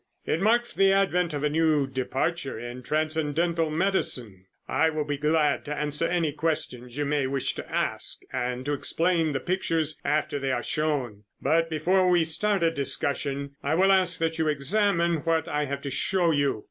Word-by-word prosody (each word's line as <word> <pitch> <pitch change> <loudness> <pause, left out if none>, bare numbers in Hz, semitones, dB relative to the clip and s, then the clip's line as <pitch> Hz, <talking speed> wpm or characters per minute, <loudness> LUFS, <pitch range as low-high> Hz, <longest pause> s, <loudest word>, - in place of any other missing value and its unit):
It 160 - -1
marks 235 +3 +2
the 195 0 +4
advent 180 -3 +2
of 145 - -3
a 150 - +2
new 155 -2 +2
departure 135 +3 -2
in 120 +2 -7
transcendental 155 +3 0
medicine. 145 - 0 0.2
I 160 - +2
will 155 -1 -2
be 145 -1 -3
glad 150 -1 +2
to 150 +1 -4
answer 150 +2 0
any 170 -4 0
questions 140 -5 -3
you 145 - 0
may 145 -2 0
wish 135 0 -1
to - - -8
ask - - -1 0.2
and 125 0 -2
to 145 - -1
explain 165 +2 +1
the 135 - -1
pictures 165 -2 -1
after 145 0 0
they 135 -1 -1
are 120 -2 -1
shown, 130 -9 -2
but 165 +1 +1
before 180 +4 +2
we 175 -2 +4
start 195 +4 +1
a 165 - +3
discussion, 140 -1 -1
I 145 +3 0
will 190 +3 +4
ask 185 -3 +3
that 165 -1 -1
you 160 - +1
examine 170 +3 +2
what 160 +1 0
I 150 0 -1
have 140 0 -5
to 140 - -4
show 175 +5 +1
you. 145 -6 +1
155 Hz, 185 wpm, -26 LUFS, 140-170 Hz, 0.2 s, the